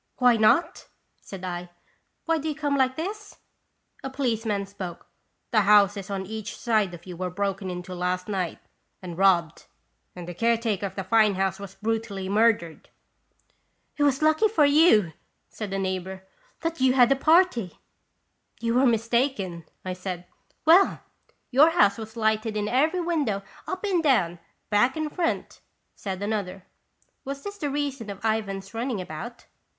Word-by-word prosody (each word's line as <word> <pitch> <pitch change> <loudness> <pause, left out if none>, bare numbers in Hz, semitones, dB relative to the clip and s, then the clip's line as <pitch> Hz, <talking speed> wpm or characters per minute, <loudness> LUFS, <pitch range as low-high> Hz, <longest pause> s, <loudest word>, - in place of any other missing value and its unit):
"Why 250 -2 +5
not?" 330 - +2 0.3
said 190 -2 -10
I. 175 -1 -5 0.6
"Why 330 -1 +1
do 315 +2 -3
you 300 - -3
come 290 -1 -1
like 260 -1 +2
this?" 410 +6 -6 0.7
A 270 - -3
policeman 225 -6 -1
spoke: 190 -3 -8 0.5
"The 220 -3 +4
houses 200 -1 +4
on 195 -1 -3
each 215 +1 -6
side 215 -6 +1
of 170 - -15
you 180 -2 -8
were 180 +1 -3
broken 195 +1 -3
into 180 +1 -6
last 180 0 -2
night 190 -5 -2 0.5
and 175 -2 -6
robbed, 175 -4 +2 0.5
and 175 -1 -8
the 175 - -5
care 230 +5 +2
taker 215 -4 -1
of - - -12
the 195 - -3
fine 215 0 +3
house 190 0 -1
was 200 -2 -9
brutally 220 -3 -3
murdered! 210 -6 +1 0.5
" - - -44
"It - - -3
was 285 0 +2
lucky 315 +8 +4
for 355 -9 +3
you," 285 - +5 0.4
said 210 -3 -6
a 195 - -1
neighbor, 190 0 -3 0.2
" - - -35
that 330 -3 -3
you 260 -1 +4
had 250 -1 +5
a - - +5
party." 310 - +3 0.4
" - - -40
You 230 +1 +1
are 270 - +5
mistaken," 230 - 0 0.2
I 185 - -2
said. 180 -1 -6 0.4
"Well, 350 +5 +5 0.5
your 285 +5 +6
house 225 - +3
was 220 +1 -9
lighted 220 0 0
in 210 0 -1
every 305 - +2
window, 290 - -1 0.2
up 370 +1 -4
and 380 -5 +1
down, 190 - +2 0.3
back 225 +6 +3
and 310 -1 -3
front," 340 -2 -2 0.3
said 195 -1 -5
another. 200 -3 -3 0.6
Was 275 +1 -6
this 405 0 -7
the 290 - -2
reason 275 -5 -3
of 200 +2 -7
Ivan's 200 -3 -2
running 230 -1 -2
about 185 +8 -7
220 Hz, 165 wpm, -25 LUFS, 190-275 Hz, 0.7 s, your